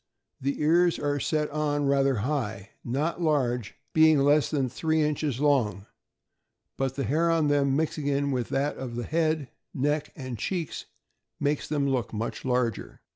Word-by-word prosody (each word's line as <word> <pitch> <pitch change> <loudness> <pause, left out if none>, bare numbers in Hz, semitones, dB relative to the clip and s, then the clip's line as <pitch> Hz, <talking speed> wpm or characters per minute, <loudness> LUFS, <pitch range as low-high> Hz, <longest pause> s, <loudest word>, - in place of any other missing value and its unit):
— - - -43
The 140 +2 -1
ears 170 +3 +3
are 145 0 -1
set 150 +1 -1
on 145 -1 0
rather 140 -1 +3
high, 110 -8 -3
not 150 +8 -2
large, 125 -8 0 0.2
being 160 -1 +6
less 145 +2 +3
than 140 -4 0
three 160 +5 0
inches 150 -3 -1
'long; 120 -9 +1 0.9
but 135 -1 -2
the 140 - -2
hair 155 +8 +1
on 160 -3 +2
them, 140 -2 +2
mixing 145 -2 0
with 125 -3 -2
that 140 +2 -1
of 125 -3 -6
the 120 - -3
head, 155 -4 0 0.2
neck, 145 +3 0
and 130 -5 -6
cheeks, 170 - -3 0.5
makes 145 0 0
them 145 -2 0
look 125 -4 -1
much 110 +2 -4
larger. 125 -4 -1
140 Hz, 160 wpm, -27 LUFS, 130-150 Hz, 0.9 s, being